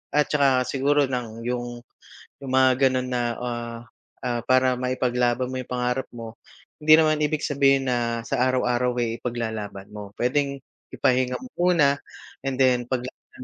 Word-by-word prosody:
at 150 0 +3
tsaka 135 -3 +3
siguro 140 +1 +2
ng 115 -3 -4
yung 120 -1 -3 0.6
yung 135 - -5
mga 130 0 +5 0.2
ganun 130 0 -1
na, 125 - 0 0.2
ah, 120 -1 -4 0.5
ah, 120 -1 -1
para 130 0 +3
maipaglaban 125 -1 0
mo - - -5
yung 125 - -8
pangarap 125 +1 -1
mo, 115 -1 -9 0.5
hindi 155 +1 +6
naman 155 -1 +3
ibig 150 0 0
sabihin 135 -1 +2
na 120 -2 0
sa 125 - +1
araw-araw 125 -1 0
ay 115 0 -2
ipaglalaban 110 -5 -4
mo. 105 -1 -8
Puwedeng 140 +2 0 0.3
ipahinga 125 0 +1
mo 255 - -9 0.2
muna 145 -5 +4 0.5
and 135 -1 -2
then 125 -2 +4
paglaanan 125 0 -6
125 Hz, 150 wpm, -24 LUFS, 120-135 Hz, 0.6 s, hindi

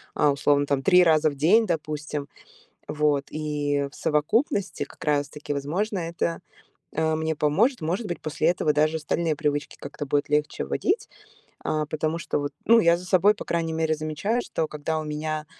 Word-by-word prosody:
а 150 - +4
условно 145 +1 +2
там 140 -1 0
3 180 +2 +6
раза 160 -2 +4
в 145 - -8
день, 205 +11 +4
допустим. 150 -3 -3 0.6
Вот, 150 -2 +1
и 145 -2 -1
в - - -19
совокупности 200 - 0
как - - -17
раз 145 -2 +1
таки, 150 0 -6
возможно, 180 +9 -2
это, 170 0 -2 0.6
а, 160 0 +1
мне 160 0 -1
поможет. 205 - +2
Может 180 +8 -1
быть, 175 - -4
после 155 0 -1
этого 170 -3 +2
даже 155 +2 +2
остальные 160 +1 -1
привычки 145 -1 -2
как-то 145 +1 -7
будет 145 +1 0
легче 150 0 0
вводить. 430 +4 -1 0.6
А, 155 0 0
потому 155 +1 -1
что - - -2
вот, 145 0 -3
ну, 230 +2 +7
я 170 -4 +4
за 180 - -10
собой, 185 +3 +4
по - - -9
крайней 165 -1 -1
мере, 160 -1 +1
замечаю, 155 +10 -1
что 160 - -2
когда 155 +1 -3
у 155 - -5
меня, 155 0 -3
155 Hz, 180 wpm, -25 LUFS, 150-170 Hz, 0.6 s, ну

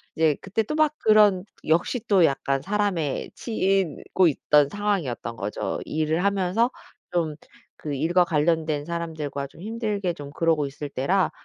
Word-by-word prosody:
이제 160 -2 +3
그때 195 +3 -1
또 300 - -4
막 310 -1 +3
그런 210 -4 +5 0.2
역시 170 +10 +2
또 190 -5 +5
약간 135 -1 0
사람에 195 -7 -1
치이고 190 - +1
있던 150 -1 +3
상황이었던 185 - -2
거죠. 100 +2 -3
일을 155 +2 0
하면서 200 +4 +2 0.4
좀 165 -3 0 0.4
그 150 -2 -5
일과 170 +6 +3
관련된 155 -2 0
사람들과 160 -4 -4
좀 140 - -19
힘들게 210 -3 -2
좀 145 -3 -9
그러고 160 -2 +1
있을 145 +1 -6
때라 180 +8 +1
170 Hz, 295 characters per minute, -25 LUFS, 150-200 Hz, 0.4 s, 그런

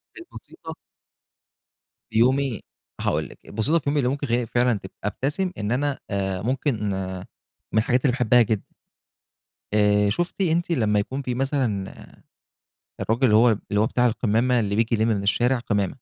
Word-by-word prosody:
كانت 350 0 -11
بسيطة. - - -10 1.3
في 110 - -3
يومي، 130 -2 +2 0.4
هاقول - - -1
لِك، - - -15
البسيطة 115 +11 +1
في - - -17
يومي 145 0 +1
اللي 125 -2 +1
ممكن 140 0 -3
تخلّيني 120 0 +1
فعلًا 120 -2 +1
تب 95 - -8
أبتسم، 145 - -2
إن 105 +1 -3
أنا 140 +2 0
آآ 95 -2 -2
ممكن 120 -2 -1 0.8
من 110 - +4
الحاجات 125 +3 +1
اللي 135 - +2
باحبها 125 -1 +4
جدًا. 110 -2 0 1.1
آآ 105 -1 +3
شُفتِ 175 - -2
أنتِ 170 -1 +1
لمّا 105 -7 +2
يكون 130 +7 -3
فيه 125 -2 -3
مثلًا 125 -7 -1 1.1
الراجل 115 +4 0
اللي 105 -3 +5
هو، 120 +2 +6 0.2
اللي 105 0 +2
هو 110 - +3
بتاع 125 +1 +2
القمامة، 120 +2 +1
اللي 100 -2 -1
بييجي 115 +1 +1
يلم 110 +2 +1
من 105 -3 0
الشارع 120 +5 +2
قمامة؟ 105 -5 -1
120 Hz, 165 wpm, -24 LUFS, 105-135 Hz, 1.3 s, هو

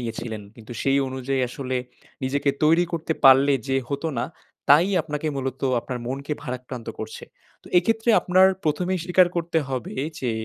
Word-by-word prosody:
নিয়েছিলেন। 115 -2 -5
কিন্তু 115 +1 -10
সেই 135 0 +3
অনুযায়ী 130 +1 -2
আসলে 130 +1 -4 0.5
নিজেকে 140 +2 +1
তৈরি 165 +3 +5
করতে 165 -1 -1
পারলে 135 +1 +7 0.2
যে 135 - +2
হত 140 +2 -4
না, - - 0 0.4
তাই 155 +6 +7 0.2
আপনাকে 150 -1 -4
মূলত 135 -1 -4 0.2
আপনার 125 0 -5
মনকে 140 +3 -4
ভারাক্রান্ত 125 -3 -6
করছে। 110 0 -7 0.4
তো - - -20
এইক্ষেত্রে 225 +6 +2
আপনার 185 +1 +5 0.2
১মেই 180 +5 0
স্বীকার 180 0 +5
করতে 170 -1 0
হবে 130 -3 -4 0.3
যে, 125 -3 -1
140 Hz, 155 wpm, -24 LUFS, 130-165 Hz, 0.5 s, পারলে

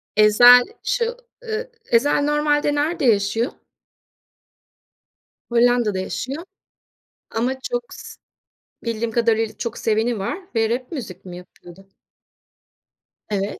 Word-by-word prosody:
Ezel, 245 +4 +8 0.2
şu - - -1 0.3
ııı, 460 +1 -4 0.2
Ezel 285 +5 +3
normalde 295 0 +1
nerede 305 +1 0
yaşıyor? 225 +2 +2 2.0
Hollanda'da 235 -4 +2
yaşıyor 270 - -4 0.9
ama 240 +4 -1
çok 485 - -4
sı - - -11 0.7
bildiğim 230 0 -2
kadarıyla, 225 -2 +1
çok 235 +1 -4
seveni 225 +1 0
var 195 - -3 0.2
ve 225 -1 +2
rap 250 +4 -3
müzik 200 - -7
mi 180 -1 -8
yapıyordu? 180 +1 -15 1.4
Evet. 200 -1 -2
235 Hz, 100 wpm, -21 LUFS, 215-290 Hz, 2.0 s, Ezel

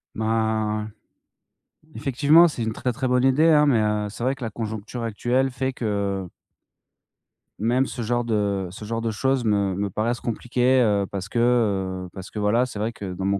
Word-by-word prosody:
Ben, 110 -1 -1 1.0
effectivement, 145 +5 +5
c'est 125 - -6
une 110 -1 -2
très 125 - -2
très 130 +3 -2
bonne 125 0 +2
idée 140 +5 +4
hein, 150 -2 +5
mais, 130 -6 +3
heu, 105 0 0
c'est 115 +3 -7
vrai 135 +1 +1
que 130 - -9
la 115 - -2
conjoncture 110 +2 -5
actuelle 120 +4 0
fait 130 +1 -2
que 100 -5 -2 1.3
même 120 +5 +2
ce 125 - -6
genre 120 +1 0
de 100 -4 -1
ce 105 +3 -9
genre 115 +1 -3
de 115 -1 -1
choses 130 +3 0
me 100 -3 +1
me 100 +1 -2
paraissent 115 +5 -1
compliquées, 125 +2 +1
heu, 100 -3 +2
parce 95 -1 -5
que, 120 - -1 0.7
heu, - - -10
parce 95 -1 -9
que 105 - -5
voilà, 110 +4 +2
c'est 115 -5 -7
vrai 110 +2 -1
que 95 -4 -6
dans 95 +1 -4
mon 100 0 +1
110 Hz, 195 wpm, -24 LUFS, 105-125 Hz, 1.3 s, effectivement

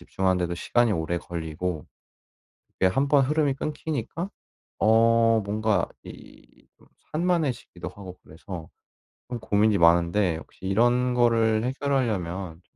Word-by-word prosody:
집중하는데도 90 -2 -1
시간이 120 +4 +2
오래 80 0 -1
걸리고 85 -1 -4 0.9
이게 95 - +2
1 135 +10 +1
번 140 -2 +4
흐름이 150 -1 +1
끊기니까 155 - -4 0.5
어 115 +1 +4
뭔가 105 -2 0 0.2
이 - - -15 0.4
산만해지기도 155 - -1
하고 95 -3 -11
그래서 80 +1 -9 0.6
좀 120 - -4
고민이 105 -1 +2
많은데 85 +1 +3
혹시 95 - -13
이런 120 +5 +2
거를 115 -2 +3
해결하려면 100 - -2
110 Hz, 270 characters per minute, -25 LUFS, 90-125 Hz, 0.9 s, 번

